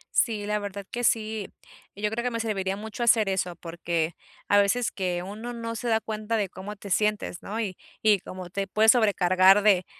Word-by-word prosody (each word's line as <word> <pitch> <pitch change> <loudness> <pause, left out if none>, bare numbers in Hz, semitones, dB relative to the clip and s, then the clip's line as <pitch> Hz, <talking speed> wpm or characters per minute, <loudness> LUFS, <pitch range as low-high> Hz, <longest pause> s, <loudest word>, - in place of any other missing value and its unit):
Sí, 215 -3 +2
la 210 0 0
verdad 200 -1 -6
que 245 - -4
sí. 220 -2 0 0.4
Yo 210 +1 -1
creo 235 +2 -3
que 250 - -1
me 230 - -2
serviría 195 -4 -1
mucho 220 +3 -5
hacer 225 -3 +4
eso 180 -2 -1
porque 170 -1 -3 0.3
a 205 - +4
veces 220 +4 +2
que 180 -2 -2
uno 220 +5 -6
no 230 -1 -5
se 240 - -4
da 220 -1 +3
cuenta 215 +1 -3
de 200 -3 -1
cómo 195 +3 -8
te 200 0 -10
sientes, 210 -2 0
¿no? 215 +3 -4
Y 195 -5 -3 0.2
y, 210 -2 +4
como 185 0 -8
te 195 +2 -3
puedes 220 +1 +5
sobrecargar 195 -3 +5
de 195 -4 +4
205 Hz, 205 wpm, -26 LUFS, 190-220 Hz, 0.4 s, puedes